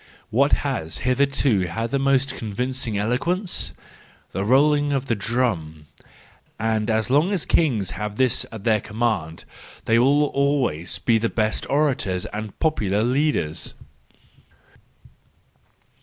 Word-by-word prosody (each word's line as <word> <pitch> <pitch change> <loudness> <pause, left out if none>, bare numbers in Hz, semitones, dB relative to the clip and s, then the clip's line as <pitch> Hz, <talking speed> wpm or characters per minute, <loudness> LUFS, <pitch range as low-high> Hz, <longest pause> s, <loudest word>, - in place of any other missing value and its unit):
—What 140 +6 +3
has 80 - -2
hitherto 130 -6 +2
had 115 +6 -3
the 140 - +1
most 135 -1 +2
convincing 120 +1 -3
eloquence? 170 - -1 0.6
The 95 - -2
rolling 145 +5 +3
of 135 -1 -1
the 120 - 0
drum: 100 -9 -2 0.7
and 110 -1 0
as 110 +1 0
long 150 +7 +4
as 190 -6 0
kings 120 - +1
have 105 -1 -5
this 130 0 +1
at 110 -3 -8
their 110 -2 +2
command, 105 -8 -2 0.4
they 115 +1 +3
will 140 +4 +4
always 140 - 0
be 115 -2 +2
the 115 +1 0
best 110 -1 -1
orators 135 -11 0
and 105 -1 -6
popular 105 - 0
leaders. 125 - 0
120 Hz, 125 wpm, -23 LUFS, 105-140 Hz, 0.7 s, long